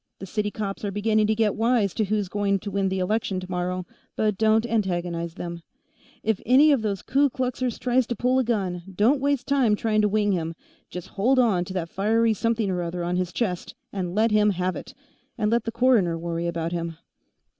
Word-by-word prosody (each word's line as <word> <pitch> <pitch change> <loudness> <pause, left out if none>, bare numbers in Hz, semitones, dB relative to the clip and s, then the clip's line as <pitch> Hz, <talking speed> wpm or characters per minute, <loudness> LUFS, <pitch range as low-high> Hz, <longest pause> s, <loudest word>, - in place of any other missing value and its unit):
The 195 - -8
city 210 +2 -2
cops 205 -1 -5
are 205 - -1
beginning 215 +1 +1
to 220 - +2
get 215 -2 +2
wise 225 -4 +1
to 215 - 0
who's 205 -1 -1
going 200 +1 0
to 205 - -5
win 195 0 0
the 190 - -2
election, 190 0 -1
tomorrow, 180 0 -3 0.3
but 215 -1 +1
don't 220 +2 +3
antagonize 175 -6 -2
them. 170 -1 -5 0.7
But - - -3
if 210 - -5
any 275 +6 +6
of 275 -5 +3
those 200 -3 -2
Ku 280 +1 +2
Kluxers 255 -1 -2
tries 250 -1 +1
to 240 - -2
pull 250 +4 +2
a - - +2
gun, 195 -7 -1
don't 245 +8 +3
waste 280 -2 0
time 265 -6 +3
trying 215 0 +1
to 210 - +2
wing 205 0 +1
him. 165 -3 -2 0.3
Just 180 -1 -7
hold 245 +7 +1
on 210 -8 +3
to 185 - -7
that 175 -3 -2
fiery 220 +5 +2
something 225 -1 0
or 180 -1 -1
other 175 +1 -3
on 175 +1 -1
his 180 -1 -1
chest 180 -6 -3 0.2
and 185 -2 -3
let 220 +1 +3
him 210 0 +4
have 185 -1 -1
it, - - -9 0.4
and 215 -2 0
let 235 -1 +1
the 230 - -2
coroner 230 -8 +3
worry 170 0 -3
about 170 -1 -2
him." 170 -2 -4
210 Hz, 215 wpm, -25 LUFS, 180-230 Hz, 0.7 s, any